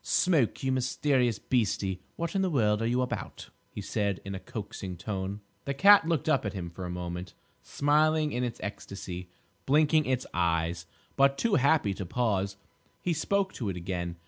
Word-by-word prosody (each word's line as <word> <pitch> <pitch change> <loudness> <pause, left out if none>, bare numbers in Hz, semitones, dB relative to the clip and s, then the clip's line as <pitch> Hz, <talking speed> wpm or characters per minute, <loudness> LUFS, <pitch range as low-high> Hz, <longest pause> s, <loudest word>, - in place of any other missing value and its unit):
"Smoke, 155 - +2
you 130 - +1
mysterious 130 -2 +1
beastie, 100 -7 0
what 170 0 -3
in 195 - +1
the 190 - +1
world 110 -8 +2
are 115 - +1
you 125 +2 +2
about?" 125 - -5 0.2
he - - -7
said, 100 -2 -1
in 100 - -4
a 95 - -4
coaxing 95 -3 -6
tone. 100 +1 -4 0.2
The 140 - -2
cat 200 +2 +7
looked 165 -4 0
up 155 -4 +3
at 105 - -3
him 90 -4 -5
for 90 +2 -7
a - - -5
moment, 90 +1 -5 0.3
smiling 155 +1 +2
in 125 -1 -1
its 120 -2 -3
ecstasy, 95 -3 -6 0.4
blinking 155 +2 +4
its 130 -1 0
eyes, 85 -1 0 0.3
but 140 0 +4
too 230 +5 +1
happy 140 - +3
to 95 - -5
pause. 100 -3 0 0.5
He 175 - +1
spoke 190 +4 0
to 110 -6 -3
it 90 - -3
again. 85 -1 -3
115 Hz, 180 wpm, -29 LUFS, 95-145 Hz, 0.5 s, cat